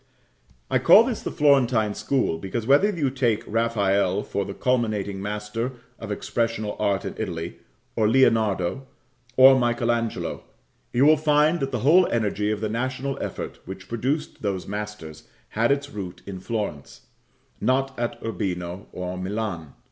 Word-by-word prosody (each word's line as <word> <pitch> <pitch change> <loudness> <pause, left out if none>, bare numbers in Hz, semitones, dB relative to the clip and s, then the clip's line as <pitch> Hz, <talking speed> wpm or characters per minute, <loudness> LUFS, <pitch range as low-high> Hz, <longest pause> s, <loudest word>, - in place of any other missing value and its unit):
I - - +3
call 220 - +8
this 235 -2 -3
the - - -3
Florentine 125 -7 +3
school, 125 -13 0
because, 105 +6 -4
whether 145 - +5
you 155 -10 -1
take 120 -5 0
Raphael 100 -3 +1
for 100 - -3
the 100 - -7
culminating 110 -6 -1
master 105 +4 -3 0.3
of 110 -2 -6
expressional 110 0 -2
art 100 -2 0
in - - -4
Italy, 85 -5 -4 0.4
or 110 -2 +2
Leonardo, 115 -2 +2 0.5
or 130 0 +8
Michael 120 -1 +1
Angelo, 115 -1 -2 0.5
you 125 +3 +3
will 155 +1 +6
find 150 +2 +3
that 135 -1 -2
the 125 - -2
whole 175 +5 +6
energy 105 -2 0
of 105 -1 -2
the 110 - 0
national 130 +4 -2
effort - - -5
which 95 +1 -9
produced 130 +7 -2
those 100 -3 -2
masters 105 -7 -7 0.2
had 115 +4 +1
its 140 0 -1
root 95 -5 -7
in 95 -2 -7
Florence; 100 - -5 0.6
not 135 +1 +1
at 120 0 -2
Urbino 90 -3 -4
or 90 0 -5
Milan. 95 -6 -4
110 Hz, 150 wpm, -24 LUFS, 100-130 Hz, 0.6 s, call